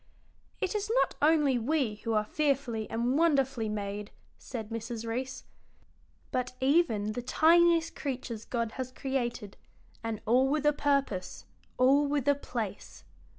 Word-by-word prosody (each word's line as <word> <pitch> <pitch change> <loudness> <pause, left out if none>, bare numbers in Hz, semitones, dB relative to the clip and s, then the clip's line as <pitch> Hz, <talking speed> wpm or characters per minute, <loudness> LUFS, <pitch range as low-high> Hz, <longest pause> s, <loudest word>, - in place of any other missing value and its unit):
"It 380 - -1
is 420 0 -2
not - - -5
only 295 -4 +4
we 260 -2 0
who 225 +1 -3
are 215 -1 +2
fearfully 265 -5 -1
and 240 +5 0
wonderfully 270 -8 +2
made," 205 0 -4 0.3
said 225 -4 -6
Mrs. 230 0 -5
Reece, 255 +4 -4 0.9
"but 255 0 -2
even 260 -7 +2
the 245 - -4
tiniest 335 +5 +4
creatures 255 -5 -4
God 230 -2 -2
has 255 0 -5
created, 245 -6 -3 0.5
and 225 -2 -3
all 255 +4 +4
with 300 +1 0
a 295 - +5
purpose, 275 -11 -1 0.3
all 275 +3 +4
with 285 -2 -1
a 285 - +6
place." 230 -7 -6
255 Hz, 140 wpm, -30 LUFS, 225-285 Hz, 0.9 s, a